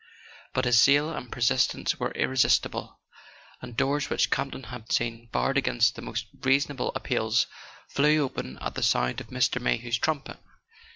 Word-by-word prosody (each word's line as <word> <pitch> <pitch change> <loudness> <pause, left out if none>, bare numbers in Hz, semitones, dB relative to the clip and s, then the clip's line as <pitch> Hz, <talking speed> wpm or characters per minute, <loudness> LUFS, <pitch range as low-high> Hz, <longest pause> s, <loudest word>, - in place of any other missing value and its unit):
But 130 - 0
his 120 -2 +5
zeal 145 +3 +4
and 125 -6 -7
persistence 125 +1 +1
were - - -1
irresistible, 130 -1 +1 0.6
and 115 - -9
doors 145 +2 +1
which - - +1
Campton 135 -1 -2
had 120 +1 -9
seen 115 -1 -1
barred 135 +4 +1
against 120 -4 +2
the - - -8
most 115 0 -4 0.2
reasonable 135 0 +1
appeals 110 -2 +1 0.4
flew 150 +2 +3
open 95 - -5
at - - -4
the - - -4
sound 60 0 +1
of - - -11
Mr. - - 0
Mayhew's 115 - 0
trumpet. 155 0 -2
125 Hz, 155 wpm, -27 LUFS, 115-140 Hz, 0.6 s, his